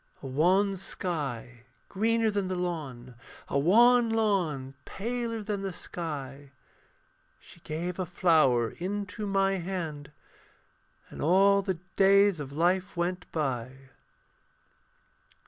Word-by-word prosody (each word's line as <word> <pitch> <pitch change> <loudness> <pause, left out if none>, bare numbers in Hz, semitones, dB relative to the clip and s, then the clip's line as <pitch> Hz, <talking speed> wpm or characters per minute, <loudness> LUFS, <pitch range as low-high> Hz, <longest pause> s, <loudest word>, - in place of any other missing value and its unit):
A - - -7
wan 185 +9 +2
sky 140 - -4 0.3
greener 225 +2 +1
than 200 -2 -1
the 185 - -2
lawn, 145 -9 -5 0.3
A 140 - 0
wan 235 - +5
lawn 180 -12 0
paler 230 +1 -4
than 205 -1 -3
the 195 -1 -3
sky. 145 -6 -6 0.9
She - - -17
gave 170 +3 -5
a 185 - -1
flower 155 - +3
into 205 +3 -4
my 195 0 +1
hand, 165 -5 -5 1.0
And - - -8
all 195 +5 +4
the 190 -3 -2 0.2
days 200 -2 +5
of 140 -2 -6
life 180 +5 0
went 180 +1 -2
by. 135 -3 -4
180 Hz, 110 wpm, -28 LUFS, 145-200 Hz, 1.0 s, wan